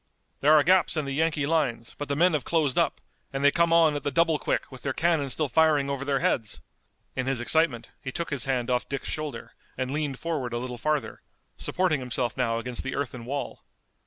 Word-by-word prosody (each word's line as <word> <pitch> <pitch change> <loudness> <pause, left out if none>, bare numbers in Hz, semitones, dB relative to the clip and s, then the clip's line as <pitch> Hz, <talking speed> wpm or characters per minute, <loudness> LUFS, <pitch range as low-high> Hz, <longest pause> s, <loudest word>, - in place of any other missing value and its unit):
There 150 +2 +5
are 150 - +6
gaps 175 0 +3
in 155 - 0
the 140 - -4
Yankee 155 -1 +1
lines, 135 -7 0
but 145 - -5
the 140 - -1
men 175 +4 +4
have 150 -4 0
closed 155 -6 +1
up, 170 -4 +1 0.3
and 135 0 -3
they 145 - +6
come 170 +1 +2
on 165 -3 +5
at 145 - -2
the - - -1
double 160 +2 +2
quick - - -2
with 130 -2 -11
their 135 - -2
cannon 160 -4 +1
still 155 +3 0
firing 145 0 +3
over 140 -1 -3
their 140 -1 0
heads!" 110 -3 0 0.6
In 130 0 -2
his 135 -2 +1
excitement 120 -1 +1
he 130 - -5
took 170 +3 -4
his 140 -4 -1
hand 125 -2 0
off 125 0 0
Dick's 140 - -4
shoulder 155 -2 -5 0.2
and 130 0 -2
leaned 145 -3 -2
forward 145 -7 -3
a - - 0
little 125 0 -5
farther, 155 +2 -1 0.3
supporting 180 -5 +1
himself 125 -1 -1
now 115 -3 0
against 120 +1 -3
the 130 - -4
earthen 125 -4 -4
wall. 140 +3 -4
140 Hz, 220 wpm, -27 LUFS, 130-155 Hz, 0.6 s, are